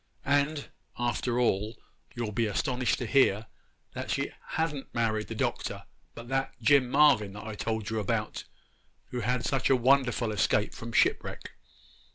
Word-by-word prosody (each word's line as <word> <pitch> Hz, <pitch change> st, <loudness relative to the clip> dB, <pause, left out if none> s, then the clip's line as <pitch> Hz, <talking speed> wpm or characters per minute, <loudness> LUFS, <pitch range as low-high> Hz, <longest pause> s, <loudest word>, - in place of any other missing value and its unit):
And, 145 Hz, +1 st, +1 dB, 0.3 s
after 120 Hz, 0 st, 0 dB
all, 110 Hz, -2 st, +1 dB, 0.4 s
you'll 120 Hz, -3 st, -3 dB
be 115 Hz, +2 st, 0 dB
astonished 125 Hz, +4 st, 0 dB
to 125 Hz, -, -3 dB
hear 110 Hz, -3 st, +3 dB, 0.5 s
that -, -, -5 dB
she -, -, -1 dB, 0.2 s
ha'n't 155 Hz, -4 st, -2 dB
married 110 Hz, -2 st, 0 dB
the -, -, -6 dB
Doctor, -, -, -2 dB, 0.3 s
but 115 Hz, -, -9 dB
that 135 Hz, +1 st, -1 dB
Jim 125 Hz, +2 st, +4 dB
Marvyn 125 Hz, -9 st, +4 dB
that 105 Hz, -, -8 dB
I 110 Hz, -, -5 dB
told 110 Hz, 0 st, -3 dB
you 110 Hz, -, 0 dB
about, 105 Hz, -, -2 dB, 0.6 s
who 125 Hz, -, -3 dB
had 125 Hz, +1 st, -1 dB
such 135 Hz, -2 st, +1 dB
a 135 Hz, -, +6 dB
wonderful 125 Hz, -2 st, +2 dB
escape 105 Hz, +1 st, +1 dB
from 115 Hz, +1 st, -7 dB
shipwreck. -, -, +1 dB
120 Hz, 155 wpm, -29 LUFS, 110-135 Hz, 0.6 s, a